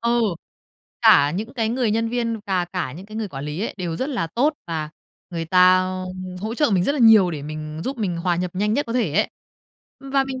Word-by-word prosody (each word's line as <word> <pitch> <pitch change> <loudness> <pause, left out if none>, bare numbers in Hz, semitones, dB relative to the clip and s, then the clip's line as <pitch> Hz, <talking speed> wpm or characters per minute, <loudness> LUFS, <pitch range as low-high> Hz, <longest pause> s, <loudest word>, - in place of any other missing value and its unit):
Ờ, 235 0 +1 0.9
cả 145 0 +6
những 220 - -5
cái 225 -3 0
người 240 -1 0
nhân 225 +1 0
viên 230 -1 -1
và 185 -2 +1
cả 175 -7 -4
những 185 +6 -10
cái 215 - -9
người 220 -2 -3
quản 135 -3 -7
lý 150 +4 -4
ấy, - - -3
đều 170 -3 -3
rất 260 - -2
là 250 - -1
tốt 270 - +1
và 155 -3 -3 0.4
người 165 -1 -3
ta 185 +2 +5 0.6
hỗ 220 +3 -3
trợ 295 0 +2
mình 185 -3 +2
rất 280 - +2
là 295 - -3
nhiều 220 -7 +7
để 150 -3 -5
mình 155 +1 -6
giúp 265 -1 -3
mình 190 -6 -1
hòa 175 0 0
nhập 180 +1 -2
nhanh 210 +3 0
nhất 290 - 0
có 230 - -4
thể 230 -11 0
ấy. 210 +4 +2 0.7
Và 275 0 0
mình 260 -1 -5
200 Hz, 235 wpm, -22 LUFS, 170-235 Hz, 0.9 s, nhiều